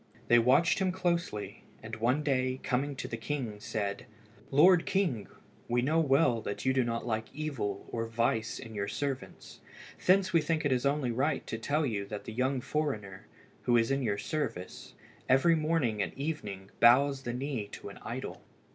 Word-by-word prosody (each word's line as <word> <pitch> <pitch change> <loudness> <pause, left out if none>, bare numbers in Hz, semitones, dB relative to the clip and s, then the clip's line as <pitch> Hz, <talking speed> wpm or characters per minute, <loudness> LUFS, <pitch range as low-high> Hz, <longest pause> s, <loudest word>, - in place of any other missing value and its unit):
They 120 - +7
watched 130 +9 +4
him 190 -1 +1
closely, 170 - -2 0.2
and 110 0 -6
one 125 +7 +1
day, 130 -2 0
coming 140 +3 -1
to - - -5
the 115 - -4
king, 115 -4 -4
said 100 -2 -3 0.4
"Lord 165 +5 +5
king, 170 - 0 0.4
we 120 0 +1
know 155 +5 +2
well 135 -6 +3
that 100 +2 -5
you 130 - +3
do 130 -1 +3
not 115 -1 -2
like 110 -2 -2
evil 135 -10 -3
or 115 -1 -2
vice 115 0 0
in 115 - -9
your 100 -1 -2
servants. 130 +5 -5 0.4
Thence 190 0 +4
we 165 - +5
think 160 0 -1
it 145 - +2
is 130 +1 +2
only 140 -3 0
right 135 +7 0
to 115 - -4
tell 150 +6 0
you 100 -6 -2
that 105 0 -6
the 110 - -7
young 130 +2 0
foreigner, 110 -11 -3 0.4
who 120 -1 +4
is 115 +2 +2
in 135 0 +1
your 105 -5 0
service, 100 - -4 0.3
every 135 +6 +5
morning 155 -9 +1
and 95 - -3
evening 105 -10 -5
bows 135 +3 +5
the 120 - -4
knee 125 -4 -3
to - - -7
an - - -11
idol." - - -6
130 Hz, 180 wpm, -30 LUFS, 110-150 Hz, 0.4 s, They